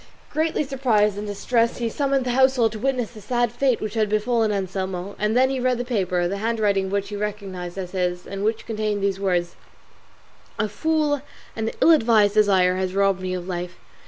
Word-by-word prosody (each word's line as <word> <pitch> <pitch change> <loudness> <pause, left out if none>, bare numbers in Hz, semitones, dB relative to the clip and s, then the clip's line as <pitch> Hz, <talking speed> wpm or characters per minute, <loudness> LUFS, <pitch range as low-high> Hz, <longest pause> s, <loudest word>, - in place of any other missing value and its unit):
Greatly 315 0 0
surprised 240 -7 +1
and 205 +1 -5
distressed 230 +3 0
he 235 - -1
summoned 275 +2 0
the 250 - 0
household 260 -3 +3
to 215 - -7
witness 255 -2 -1
the 220 -3 -12
sad 240 +1 0
fate 250 0 +1
which 215 -1 -4
had 215 -2 +1
befallen 220 +1 +1
Anselmo; 190 -1 -3
and 210 +3 +1
then 260 +1 +4
he 265 - -1
read 250 0 +1
the 245 - -3
paper, 185 -7 0
the 195 +3 -3
handwriting 210 -3 +1
of - - -6
which 200 0 -1
he 205 - -5
recognised 195 -4 -5
as 185 -2 -5
his, 180 -1 -2
and 195 0 -5
which 220 +1 -1
contained 215 -2 -2
these 195 -1 0
words: 180 -3 0 1.0
"A 210 - 0
foolish 300 +5 0 0.3
and 220 0 -1
ill 335 - +7
advised 225 -8 +4
desire 190 -4 +3
has 185 0 -2
robbed 195 -1 +2
me 185 0 -2
of 180 0 -6
life. 175 -1 -5
210 Hz, 200 wpm, -23 LUFS, 195-240 Hz, 1.0 s, ill